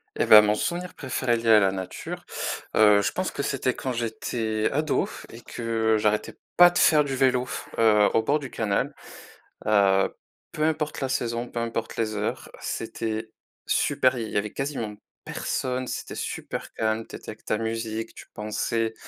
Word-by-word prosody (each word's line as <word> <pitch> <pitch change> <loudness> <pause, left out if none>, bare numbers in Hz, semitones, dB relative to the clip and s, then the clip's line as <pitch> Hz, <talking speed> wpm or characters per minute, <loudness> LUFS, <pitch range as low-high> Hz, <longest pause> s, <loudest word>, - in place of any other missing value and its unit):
Eh - - +1
ben, 105 -1 +10
mon 105 0 +2
souvenir 175 +8 -3
préféré 130 -3 0
lié 115 0 -1
à 110 -1 +8
la 95 -2 +3
nature, 95 -1 -6 0.5
heu, 105 -1 +6
je - - 0
pense 185 0 -2
que 140 - -3
c'était 130 -2 0
quand 130 - -3
j'étais 110 -1 -2
ado 150 +1 +1 0.2
et 115 - -11
que 115 -2 0
j'arrêtais 105 0 0 0.2
pas 175 0 +9
de 175 - -3
faire 150 -2 +6
du 135 -2 -3
vélo, 130 -1 +2 0.3
heu, 105 -2 +5
au 115 - +3
bord 145 +6 +2
du 135 -3 -7
canal, 105 -4 -1 0.7
heu, 100 -2 +4 0.4
peu 155 - -1
importe 155 -1 -1
la 135 - -1
saison, 120 -2 -2
peu 120 - -4
importe 115 -1 -3
les 110 -2 -1
heures, 105 +1 -3
c'était 110 0 -4 0.4
super, 130 -1 +2
il 115 -2 -4
y - - -5
avait 105 0 -1
quasiment 130 -7 -3 0.3
personne, 130 0 -2
c'était - - -5
super - - -5
calme, 110 0 -1
tu - - -11
étais - - -9
avec - - -12
ta 110 - 0
musique, 115 0 -3
tu - - -11
pensais 110 +1 -1
115 Hz, 175 wpm, -25 LUFS, 110-130 Hz, 0.7 s, ben